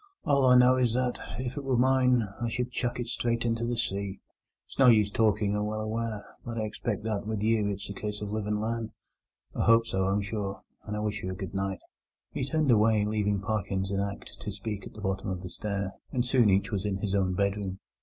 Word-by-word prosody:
All 140 -4 +4
I 125 0 +7
know 125 +1 +6
is 120 -2 +2
that, 125 -1 0 0.2
if 125 +1 -4
it 145 - -3
were 130 -2 +1
mine, 125 -1 +4 0.2
I 120 - 0
should 125 +2 -2
chuck 125 0 -1
it 120 - -1
straight 115 0 0
into 115 0 0
the 120 0 -1
sea. 100 -4 -2 0.5
It's - - -15
no 135 - +7
use 105 -4 +5
talking, 105 -1 +2
I'm 105 0 0
well 110 0 -2
aware, 110 -1 -3 0.2
but 115 -1 -5
I 110 - 0
expect 105 0 -3
that 105 -2 -2
with 110 -2 -2
you 110 -2 +2
it's 100 -1 -3
a 100 - -5
case 105 +1 -4
of 105 -1 -5
live 105 -1 -2
and 105 0 0
learn. 115 +1 -2 0.6
I - - 0
hope 115 0 +6
so, 95 -4 0
I'm 100 +1 +1
sure, 100 -1 -4 0.2
and 105 0 -3
I - - -2
wish 105 -1 -2
you 95 - -3
a 95 - -3
good 95 -1 -6
night." 95 -1 -2 0.5
He 145 - -2
turned 150 0 +2
away, 110 -1 +4
leaving 105 -2 0
Parkins 100 -2 -1
in 100 - 0
act 100 0 -5
to 105 - -5
speak 100 0 -5
at - - -13
the 105 - -9
bottom 95 -1 -2
of 90 -1 -4
the 90 - -5
stair, 100 0 -3 0.2
and 125 -1 0
soon 120 -3 +4
each 95 +3 +2
was 100 -3 -1
in 100 -2 -1
his 95 0 -2
own 95 -2 +1
bedroom. 100 -1 -1
105 Hz, 240 wpm, -29 LUFS, 100-115 Hz, 0.6 s, I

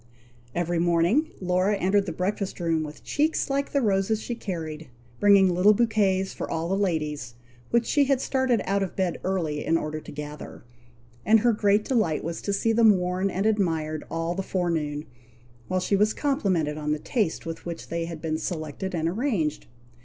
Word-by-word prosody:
Every 175 0 0
morning, 175 - +3
Laura 185 +2 +1
entered 195 +1 +1
the - - -2
breakfast 190 +4 -2
room 165 -2 +1
with 150 -1 -8
cheeks 300 -1 0
like 280 +1 -1
the 280 -2 +1
roses 200 +1 +1
she 240 - -4
carried, 160 - -5 0.3
bringing 200 -3 +6
little 195 +4 +5
bouquets 200 -4 +1
for - - -5
all 165 +1 -2
the 195 - +1
ladies, 150 -10 -2 0.3
which 235 0 +2
she 290 -1 +3
had 270 -1 +2
started 260 -4 +1
out 195 +1 +1
of 190 - -3
bed 185 -3 -1
early, 165 -6 -1
in 165 - +2
order 155 -1 -3
to - - -11
gather; 150 -2 -8 0.6
and 220 0 +5
her 240 0 +4
great 205 0 +2
delight 215 - +1
was 165 +1 -4
to 200 - -2
see 225 +3 +1
them 220 -3 +6
worn 180 +2 -1
and 195 +2 -2
admired 165 -8 0
all 165 +1 -2
the 190 - -2
forenoon, 160 -6 -2 0.6
while 185 0 0
she 190 +2 +1
was 210 +2 +2
complimented 185 - 0
on 150 0 -1
the - - -1
taste 200 - -1
with 165 +1 -6
which 170 -1 -6
they 170 0 -2
had 165 -1 -8
been 155 -1 -1
selected 165 +3 -4
and 165 -1 0
arranged. 180 - -1
185 Hz, 185 wpm, -26 LUFS, 165-210 Hz, 0.6 s, bringing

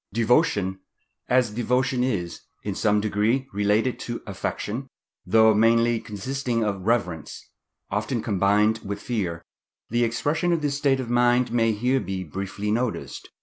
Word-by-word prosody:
Devotion.—As 115 - 0
devotion 125 +2 0
is, 90 -10 -2 0.2
in - - -2
some 105 0 +2
degree, 110 +5 0
related 105 +5 +1
to 120 -1 -5
affection, 105 +5 -4 0.4
though 110 +3 +5
mainly 115 +2 +3
consisting 115 +3 -3
of 100 -3 -3
reverence, 90 -10 -1 0.5
often - - -1
combined 105 +3 +2
with 100 0 -5
fear, 95 -9 -3 0.5
the 120 +1 +2
expression 145 +9 0
of 165 -3 -1
this 145 -1 0
state 140 -2 +2
of 120 -2 -4
mind 120 +1 +3
may 115 -1 +2
here 125 +5 +1
be 95 -5 -4
briefly 100 +5 -4
noticed. 120 +1 -3
115 Hz, 135 wpm, -24 LUFS, 105-125 Hz, 0.5 s, though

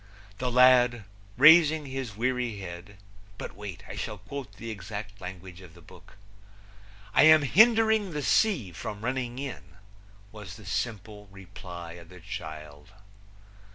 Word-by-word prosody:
The 125 -1 -2
lad, 125 -2 +5 0.3
raising 155 +2 +6
his 130 -5 -6
weary 125 -2 -1
head 95 +1 -9 0.4
but - - -8
wait, 95 -3 -8
I - - -8
shall 105 -2 -5
quote 125 +1 -8
the 115 +2 -8
exact 105 0 -8
language 90 0 -9
of 90 -3 -15
the - - -15
book: 90 +4 -17 1.0
"I - - +5
am 155 -1 +7
hindering 220 - +4
the 150 -3 -4
sea 170 - +2
from 105 +5 -7
running 125 -1 -3
in," 140 0 -8 0.6
was 105 -4 -10
the 105 - -14
simple 105 0 -5
reply 90 -3 -10
of 85 - -16
the 90 0 -13
child. 80 -3 -9
105 Hz, 140 wpm, -27 LUFS, 95-130 Hz, 1.0 s, am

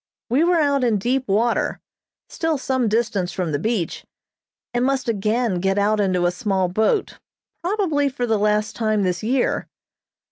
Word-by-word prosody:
We 275 +6 +4
were 350 0 +3
out 280 -3 +2
in 230 -4 +2
deep 255 +6 -1
water, 225 +4 +1 0.5
still 325 -2 -1
some 260 -2 0
distance 210 -5 0
from 175 -4 -2
the 145 - -1
beach, 205 -2 -2 0.7
and 240 0 +1
must 265 -1 0
again 215 -1 0
get 195 +2 0
out 210 +1 +2
into 185 -3 +1
a 175 - +3
small 190 -2 0
boat, 220 - 0 0.4
probably 340 -7 +1
for 250 -2 -3
the 220 -3 +1
last 210 +1 +1
time 215 -2 +1
this 180 -2 -1
year. 245 +3 0
220 Hz, 165 wpm, -22 LUFS, 195-260 Hz, 0.7 s, We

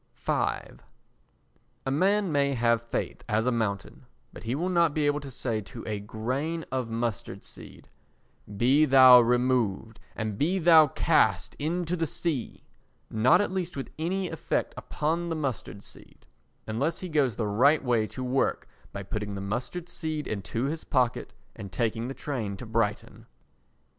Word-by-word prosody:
v - - -3 1.5
A 135 - -1
man 195 +5 +2
may 140 -1 +1
have 115 -1 +2
faith 115 - -4
as 110 +2 +1
a 125 - +2
mountain, 105 -5 -3 0.3
but - - -10
he 120 +3 -1
will 170 +5 -1
not 170 -4 +2
be 150 -1 +1
able 145 0 +1
to 140 -1 -9
say 115 -4 -3
to 115 +3 -10
a 105 -2 -3
grain 130 +11 -3
of 130 -3 -2
mustard 115 -1 -3
seed: - - -13 0.7
"Be 135 +7 +4
thou 130 -3 +9
removed, 120 -3 0 0.2
and 110 -3 -4
be 175 +6 +1
thou 165 -3 +7
cast 110 - +2
into 170 +3 -1
the 165 -2 -1
sea"—not 130 - -1
at 205 - -1
least 180 -4 -3
with 135 - -5
any 185 +4 -1
effect 160 - -2
upon 165 +3 -2
the 165 - -1
mustard 130 -8 -4
seed—unless 135 +10 -6
he 185 - -4
goes 145 - +1
the 115 - -2
right 135 +10 +3
way 120 -4 +1
to 130 - -7
work 130 +1 0 0.2
by 100 - -6
putting 105 +1 -4
the - - -4
mustard 120 - -4
seed 155 -3 -4
into 105 +3 -3
his 155 +4 -2
pocket 125 -2 0 0.2
and 100 -4 -8
taking 115 +2 -1
the 135 - -6
train 110 -9 -4
to 125 - -8
Brighton. 110 -2 -2
130 Hz, 160 wpm, -27 LUFS, 110-155 Hz, 1.5 s, thou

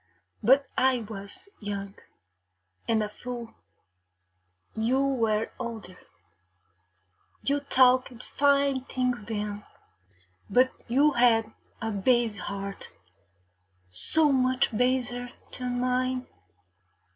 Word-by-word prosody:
But 265 +5 +5
I 260 -2 +2
was 205 - -6
young 200 -2 -5 0.9
and 225 -2 +2
a - - -2
fool; 240 +1 -7 1.2
you 230 +4 +1
were 225 -5 0
older. 225 -7 -7 1.4
You 285 +1 +1
talked 255 -3 +3
fine 280 -2 +2
things 250 -4 -2
then, 210 -1 -4 0.9
but 255 +1 +4 0.2
you 280 +5 +4
had 225 -3 +3 0.3
a 225 - -1
base 220 0 +1
heart, 200 0 -6 1.0
so 295 - +4
much 255 -3 +1
baser 245 0 0 0.2
than 250 -1 -3
mine.... 255 0 0
245 Hz, 90 wpm, -27 LUFS, 215-255 Hz, 1.4 s, But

